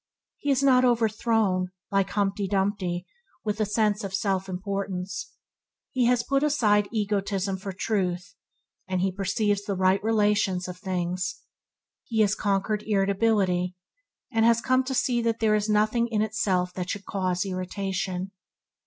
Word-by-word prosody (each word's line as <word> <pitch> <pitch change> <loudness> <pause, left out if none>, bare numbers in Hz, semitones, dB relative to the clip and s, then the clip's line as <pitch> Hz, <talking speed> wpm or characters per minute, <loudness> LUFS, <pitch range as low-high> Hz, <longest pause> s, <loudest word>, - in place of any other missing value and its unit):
He 290 - -3
is 275 0 +2
not 255 -2 +5
overthrown, 225 -5 +2 0.2
like 195 -1 +2
Humptydumpty, 195 -2 -1 0.4
with 210 0 -1
a 215 - +1
sense 210 0 +1
of 195 -1 -3
self 195 -1 -1
importance. 190 +1 -4 0.6
He 255 -2 +2
has 240 0 +3
put 275 +3 +1
aside 215 -9 +3
egotism 200 -3 -1
for 195 +1 -6
truth, 185 -1 -2 0.5
and 185 -1 -1
he 190 0 +1
perceives 200 +2 0
the 200 - -2
right 185 +1 +2
relations 205 -4 +2
of 180 0 -7
things. 185 -1 -3 0.6
He 225 -2 0
has 210 -1 +3
conquered 205 +1 0
irritability, 195 -3 +1 0.6
and 225 -2 +2
has 230 0 +5
come 255 +2 +2
to 265 0 -2
see 245 -2 +1
that 230 -1 0
there 220 -2 +3
is 210 0 +1
nothing 215 +3 +2
in 215 -2 0
itself 185 -4 0
that 180 0 -4
should 200 -1 -4
cause 185 -1 -1
irritation. 190 0 -3
200 Hz, 145 wpm, -26 LUFS, 185-220 Hz, 0.6 s, not